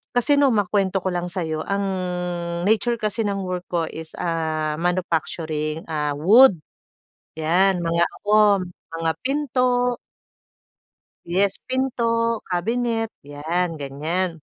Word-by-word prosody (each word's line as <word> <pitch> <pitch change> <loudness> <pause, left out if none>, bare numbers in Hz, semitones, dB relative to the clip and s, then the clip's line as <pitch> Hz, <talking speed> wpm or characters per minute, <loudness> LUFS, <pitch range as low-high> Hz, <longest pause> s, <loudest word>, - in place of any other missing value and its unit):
Kasi 265 +4 +3
nong, 275 -5 +4
makwento 195 -2 +1
ko 185 - 0
lang 175 0 -2
sa'yo, 165 -3 -3
ang 200 0 0 0.8
nature 220 +4 +2
kasi 220 -1 -2
ng 200 -1 -2
work 180 -1 -4
ko 170 -2 0
is 160 0 -7
ah, 155 -2 -1
manufacturing 160 -3 -1
ah 150 -2 -1
wood 200 - +7 0.9
'Yan, 180 +3 +3
mga 170 0 +2
ano, 210 +1 +3 0.3
mga 165 0 -1
pinto 250 -3 +1 1.3
yes, 195 +3 +1
pinto, 230 -3 0
kabinet, 225 +5 -1
'yan 165 +4 -2
ganyan. 160 +5 -3
185 Hz, 110 wpm, -23 LUFS, 165-225 Hz, 1.3 s, wood